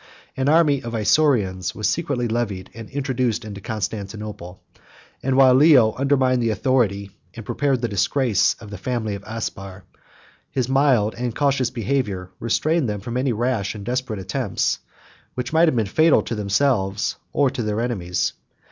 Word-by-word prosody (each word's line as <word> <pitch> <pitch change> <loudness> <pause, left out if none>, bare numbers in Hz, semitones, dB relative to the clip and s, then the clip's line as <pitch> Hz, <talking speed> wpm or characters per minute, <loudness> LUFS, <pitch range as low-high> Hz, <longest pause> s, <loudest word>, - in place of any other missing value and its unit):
An 135 +1 0
army 150 -4 +4
of 115 0 -5
Isaurians 105 -5 +2
70 90 - -4
was 105 - 0
secretly 140 -8 -1
levied, 110 -5 -3
and 115 -1 -9
introduced 130 -5 -1
into 100 -2 -8
Constantinople; 105 -3 -5 0.6
and 130 0 0
while 130 -1 +7
Leo 130 -5 +6
undermined 130 -2 +2
the 115 - +1
authority, 105 -3 0 0.2
and 115 -2 -8
prepared 140 -1 0
the - - +2
disgrace, 105 +2 +1
of 105 -3 -12
the 100 - -7
family 115 -2 -2
of 100 0 -7
Aspar, 100 -4 -6 0.7
his 130 -2 -1
mild 130 -6 +3
and 120 -2 -2
cautious 140 -3 +1
behavior 105 -7 -2
restrained 150 +4 +1
them 105 -1 -3
from 120 +4 -6
any 130 +1 +1
rash 115 -2 -1
and 100 -2 -8
desperate 125 -3 -2
attempts, 95 +3 -1 0.6
which 125 +3 -4
might 165 +1 +5
have 155 - +2
been 115 -3 +1
fatal 155 +11 +3
to - - -4
themselves, 100 -1 0
or 140 -3 +2
their 105 -2 -2
enemies. 95 -7 -1
115 Hz, 160 wpm, -22 LUFS, 105-130 Hz, 0.7 s, while